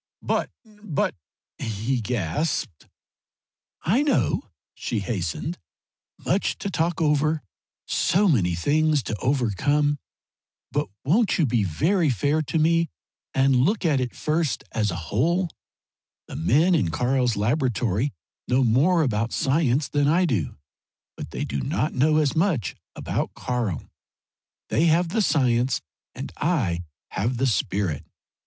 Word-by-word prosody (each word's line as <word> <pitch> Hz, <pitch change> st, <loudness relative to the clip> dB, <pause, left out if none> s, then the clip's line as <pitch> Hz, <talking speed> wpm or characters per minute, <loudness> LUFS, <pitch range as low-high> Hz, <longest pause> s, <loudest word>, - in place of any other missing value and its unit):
"But -, -, 0 dB, 0.2 s
but 210 Hz, -8 st, -2 dB, 0.3 s
" -, -, -70 dB
he 115 Hz, +4 st, -2 dB
gasped. 110 Hz, -, -2 dB, 1.0 s
"I 220 Hz, -, +3 dB
know," 295 Hz, -1 st, +1 dB, 0.2 s
she 115 Hz, -4 st, -3 dB
hastened 100 Hz, -, -3 dB, 0.7 s
"much 190 Hz, +3 st, +1 dB
to 200 Hz, -, -4 dB
talk 170 Hz, -1 st, 0 dB
over; 155 Hz, 0 st, +2 dB, 0.4 s
so 195 Hz, +5 st, +2 dB
many 95 Hz, -, +2 dB
things 150 Hz, -, +2 dB
to 110 Hz, -, -3 dB
overcome. 145 Hz, +4 st, +1 dB, 0.7 s
But -, -, 0 dB, 0.2 s
won't 200 Hz, -, +3 dB
you 165 Hz, -, +3 dB
be 120 Hz, -4 st, +1 dB
very 160 Hz, -, +1 dB
fair 145 Hz, -, +1 dB
to 160 Hz, +2 st, -2 dB
me 165 Hz, +1 st, +3 dB, 0.5 s
and 135 Hz, -1 st, +4 dB
look 185 Hz, -, +2 dB
at 145 Hz, -5 st, +3 dB
it 125 Hz, -2 st, -3 dB
first 155 Hz, -2 st, -1 dB
as 105 Hz, -1 st, 0 dB
a 85 Hz, -, -3 dB, 0.2 s
whole? 170 Hz, -, +1 dB, 0.8 s
The -, -, -8 dB
men 150 Hz, -, +3 dB
in 140 Hz, -, +2 dB
Karl's 125 Hz, +4 st, +1 dB
laboratory 120 Hz, +1 st, 0 dB, 0.4 s
know 130 Hz, +2 st, +3 dB
more 150 Hz, +9 st, +4 dB
about 115 Hz, -3 st, 0 dB
science 140 Hz, -1 st, +1 dB
than 145 Hz, -1 st, +1 dB
I 175 Hz, +5 st, +4 dB
do. 110 Hz, -, -1 dB, 0.6 s
But -, -, -7 dB
they -, -, -3 dB
do 70 Hz, -, -3 dB
not -, -, -1 dB
know 155 Hz, +4 st, +3 dB
as 150 Hz, 0 st, +2 dB
much 160 Hz, -, +1 dB, 0.2 s
about -, -, -3 dB
Karl. 120 Hz, -, -2 dB, 0.9 s
They 160 Hz, -, +2 dB
have 170 Hz, +1 st, +3 dB
the 220 Hz, +5 st, +1 dB
science 130 Hz, -, +2 dB, 0.4 s
and -, -, -6 dB
I 105 Hz, -, 0 dB, 0.2 s
have 115 Hz, +6 st, -1 dB
the 135 Hz, -, +1 dB
spirit. 95 Hz, -, 0 dB
135 Hz, 135 wpm, -24 LUFS, 115-160 Hz, 1.0 s, and